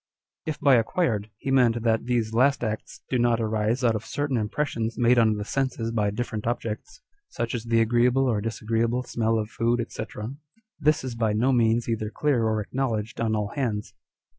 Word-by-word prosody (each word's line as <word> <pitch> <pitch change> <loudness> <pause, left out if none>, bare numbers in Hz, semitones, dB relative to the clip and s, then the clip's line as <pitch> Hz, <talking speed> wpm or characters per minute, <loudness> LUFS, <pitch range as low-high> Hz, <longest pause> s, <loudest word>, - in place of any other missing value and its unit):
If 155 - -3
by 135 -3 +5
acquired, 115 - 0
he 135 - -3
meant 120 -3 +3
that 115 -1 +1
these 115 -3 0
last 130 +3 +3
acts 110 -1 -4
do 125 - +2
not 120 -1 +3
arise 110 +2 0
out 115 -2 +4
of 110 0 -3
certain 145 0 -2
impressions 115 0 -2
made 120 0 +4
on 110 -2 +4
the 105 0 -4
senses 130 -3 -1
by 105 -3 +1
different 110 0 -4
objects, 120 - -4 0.3
(such 120 -1 -3
as 120 -2 -3
the 115 0 +3
agreeable 120 +3 +3
or 110 -4 +1
disagreeable 115 +2 -1
smell 115 -2 0
of 110 0 -3
food, 120 0 0
&c.) - - -4 0.8
this 155 0 +2
is 130 -2 -4
by 115 -2 0
no 120 +5 +2
means 115 -1 +2
either 110 -2 -1
clear 130 -1 +1
or 110 -1 0
acknowledged 115 -2 -2
on 110 -1 +1
all 105 -1 -1
hands. 110 -6 -3
115 Hz, 190 wpm, -25 LUFS, 110-125 Hz, 0.8 s, by